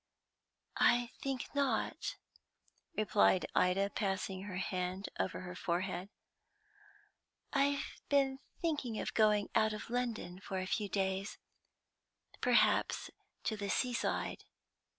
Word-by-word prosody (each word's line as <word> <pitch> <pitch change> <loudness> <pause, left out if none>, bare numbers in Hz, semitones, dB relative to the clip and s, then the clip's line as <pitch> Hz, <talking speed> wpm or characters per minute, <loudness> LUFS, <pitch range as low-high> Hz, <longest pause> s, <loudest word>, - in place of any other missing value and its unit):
"I 240 0 +5
think 270 -2 -3
not," 285 - 0 0.8
replied 205 -3 +4
Ida, 195 +2 +3
passing 195 -2 -1
her 185 -3 -5
hand 185 +1 -2
over 185 - -1
her 180 0 -6
forehead. 180 +1 -2 1.4
"I've 280 0 +1
been 270 -2 +3 0.2
thinking 290 -9 0
of - - -3
going 210 -2 +4
out 215 -1 +3
of 215 +2 -6
London 230 -7 -2
for 190 0 -4
a 185 - -1
few 205 +2 -1
days, 190 0 -1 1.0
perhaps - - +3 0.3
to 220 - 0
the 200 -1 -4
seaside." 245 +3 0
205 Hz, 110 wpm, -35 LUFS, 190-245 Hz, 1.4 s, I